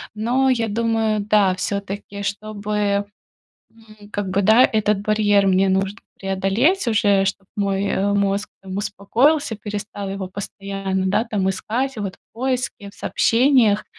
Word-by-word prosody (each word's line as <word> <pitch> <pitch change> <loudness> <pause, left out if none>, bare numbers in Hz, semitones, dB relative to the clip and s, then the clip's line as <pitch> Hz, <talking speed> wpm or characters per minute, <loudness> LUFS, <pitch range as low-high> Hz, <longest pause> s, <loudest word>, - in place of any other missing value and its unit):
Но 250 +5 +1
я 235 -3 +1
думаю, 225 0 0
да, 200 -3 +3
всё-таки, 200 +1 -4
чтобы, 205 0 -2 0.7
м, 215 -2 -17
как 205 -1 -2
бы 195 +2 +1
да, 220 +6 +6
чтобы 220 - +2
этот 210 -1 +1
барьер 205 -1 +2
мне 190 +1 +3
нужно 195 +3 0 0.2
преодолеть 195 - +1
уже, 205 -3 +3
чтоб 195 0 -3
мой, 200 -1 0
э, 200 0 0
мозг 200 0 0
там 190 0 -7
успокоился, 220 +8 +1
перестал 205 -1 -6
его 195 -1 -4
постоянно, 195 -1 -4
да, 200 +4 +2
там 200 -5 -1
искать 240 +7 -2
вот 200 -3 -4
в - - -57
поиске, 245 -4 -3
в - - -22
сообщениях. 230 -4 +3
205 Hz, 145 wpm, -21 LUFS, 195-220 Hz, 0.7 s, да